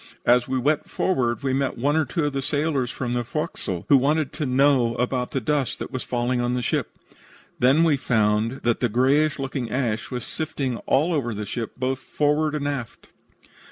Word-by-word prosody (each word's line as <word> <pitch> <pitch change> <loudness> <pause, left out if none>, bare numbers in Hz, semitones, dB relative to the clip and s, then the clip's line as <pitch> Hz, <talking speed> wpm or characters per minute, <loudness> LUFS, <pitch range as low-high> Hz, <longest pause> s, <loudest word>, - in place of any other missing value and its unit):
As 120 0 +4
we 130 0 -1
went 145 +4 0
forward 125 -8 0
we 135 -1 0
met 135 0 -1
one 145 +5 +1
or 160 -1 +2
two 150 +4 -1
of 145 - -1
the 135 - -1
sailors 145 -2 0
from 120 -1 -3
the 120 0 0
forecastle, 90 -5 -4
who 140 - +7
wanted 145 +2 +1
to 150 - -3
know 130 -2 +3
about 125 0 -1
the 135 - -1
dust 140 +1 -1
that - - -6
was 130 - -3
falling 120 0 -1
on 120 +1 0
the 125 - -2
ship. - - -2 0.6
Then 135 +6 +5
we 155 -4 +3
found 110 0 +1
that 120 -1 +1
the 125 - +1
grayish 135 +6 +2
looking 135 -3 -3
ash 115 -3 -1
was 125 -2 -4
sifting 140 -6 -3
all 155 +6 +3
over 120 -7 -1
the 105 0 -4
ship, 115 +2 -4
both 130 +1 -1
forward 150 +2 0
and 145 -1 -2
aft. 135 -6 -5
130 Hz, 200 wpm, -24 LUFS, 120-145 Hz, 0.6 s, who